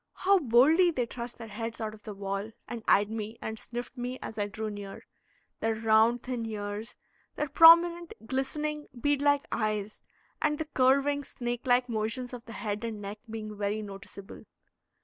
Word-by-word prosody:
How 390 +1 +3
boldly 300 +7 +5
they 255 -8 0
thrust 240 +1 -7
their 230 -2 -8
heads 225 +2 -5
out 215 -1 -3
of 215 - -13
the 210 -1 -8
wall, 195 +1 -3 0.2
and 235 -2 -6
eyed 205 +1 +4
me 220 0 -5
and 220 0 -5
sniffed 240 +1 -7
me, 250 0 -4
as 220 - -7
I 205 - 0
drew 215 +1 -4
near, 205 -1 -8 0.5
their 225 0 0
round, 225 +2 +3
thin 250 -2 -3
ears, 210 +1 -5 0.4
their 300 - -1
prominent, 335 +3 +7
glistening, 295 +4 -2
bead 290 +2 +1
like 285 +1 +3
eyes, 215 -2 -2 0.4
and 300 -1 +1
the 315 - -3
curving, 280 +1 +2
snake 240 -2 -5
like 245 0 +4
motions 230 +2 -2
of 245 -1 -8
the 230 - -9
head 210 0 -3
and 225 -2 -4
neck 205 +1 -7
being 215 -1 -6
very 205 +1 -2
noticeable. 200 0 -10
230 Hz, 175 wpm, -29 LUFS, 215-270 Hz, 0.5 s, prominent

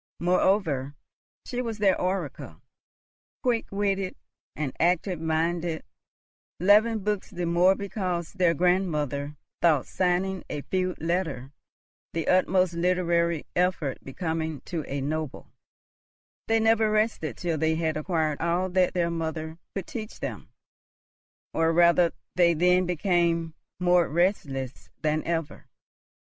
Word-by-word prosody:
Moreover, 170 -6 +1 0.5
she 250 0 -3
was 230 -3 -4
their 200 -3 +2
oracle. 185 +2 -3 0.8
Quick 240 -3 +1
witted 195 -2 -1 0.4
and 145 -4 -3
active 175 0 +1
minded, 165 +1 -1 0.8
loving 210 +4 +4
books 210 -1 -1
the 180 -2 -4
more 175 +3 +4
because 185 -4 -3
their 180 -3 +2
grandmother 150 -5 0 0.3
thought 160 -6 +4
signing 185 +1 0
a 145 - -4
feud 185 -1 -1
letter 165 -6 -2 0.6
the 165 -1 -2
utmost 185 -1 +3
literary 170 -2 +1
effort 175 -6 0
becoming 160 0 -3
to 165 -3 -4
a 140 0 -2
noble, 155 +1 -4 1.0
they 225 0 +3
never 225 0 +3
rested 215 -7 0
till 170 -4 -2
they 160 +1 +2
had 160 -1 -1
acquired 155 -2 -1
all 175 +3 +1
that 185 0 +2
their 170 -1 +1
mother 160 0 -4 0.2
could 195 -3 -3
teach 220 -2 -7
them; - - -6 1.0
or, 165 0 +2
rather, 170 0 +5 0.2
they 170 -2 +4
then 180 +2 +3
became 170 -2 +1 0.3
more 180 -1 +3
restless 145 -7 -1
than 155 0 0
ever. 165 -2 -3
175 Hz, 120 wpm, -27 LUFS, 160-185 Hz, 1.0 s, rather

